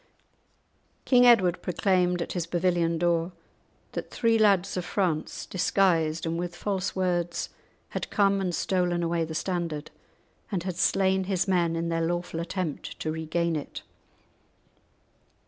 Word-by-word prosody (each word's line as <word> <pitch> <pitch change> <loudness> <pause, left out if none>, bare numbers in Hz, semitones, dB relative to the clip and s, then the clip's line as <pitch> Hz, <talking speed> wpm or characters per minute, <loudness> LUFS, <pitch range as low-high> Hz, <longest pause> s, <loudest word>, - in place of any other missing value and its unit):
King 245 -1 +6
Edward 190 -8 +5
proclaimed 180 -1 +1
at - - -8
his 175 -2 -2
pavilion 170 -1 +1
door 170 +1 +1 0.6
that - - -5
three 230 -1 +2
lads 200 -3 +3
of 180 - -2
France, 175 -5 -1
disguised, 170 -4 +1
and 165 +1 -2
with 175 0 -4
false 195 -1 -2
words, 175 -2 -1 0.4
had - - -4
come 200 -1 +2
and 180 -3 -1
stolen 180 -2 0
away 165 -1 0
the 160 0 -7
standard, 170 -4 -3 0.6
and 185 -4 -1
had 185 -2 -4
slain 190 0 +2
his 190 -1 0
men 175 -3 +2
in 165 0 -2
their 165 0 0
lawful 175 0 -2
attempt 170 -2 -4
to 155 - -2
regain 160 +1 -1
it. 145 - -6
175 Hz, 140 wpm, -27 LUFS, 165-190 Hz, 0.6 s, King